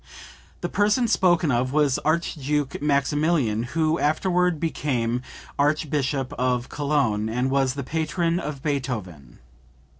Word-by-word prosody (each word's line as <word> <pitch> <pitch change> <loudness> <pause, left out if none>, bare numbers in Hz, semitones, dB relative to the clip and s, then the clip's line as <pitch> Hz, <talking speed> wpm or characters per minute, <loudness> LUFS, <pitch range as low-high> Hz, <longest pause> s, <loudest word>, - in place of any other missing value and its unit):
The - - -1
person 210 +4 +2
spoken 175 -7 +3
of 125 +1 0
was 145 -3 +2
Archduke 150 -3 -1
Maximilian, 145 -4 +1 0.2
who 160 +1 +2
afterward 180 +2 +1
became 125 -7 -1 0.4
Archbishop 145 -2 0
of 125 -1 0
Cologne, 140 -8 0
and 125 +3 -1
was 135 -1 +1
the 140 - -4
patron 165 +4 -1
of 150 -5 -6
Beethoven. 110 - -4
145 Hz, 115 wpm, -24 LUFS, 130-160 Hz, 0.4 s, spoken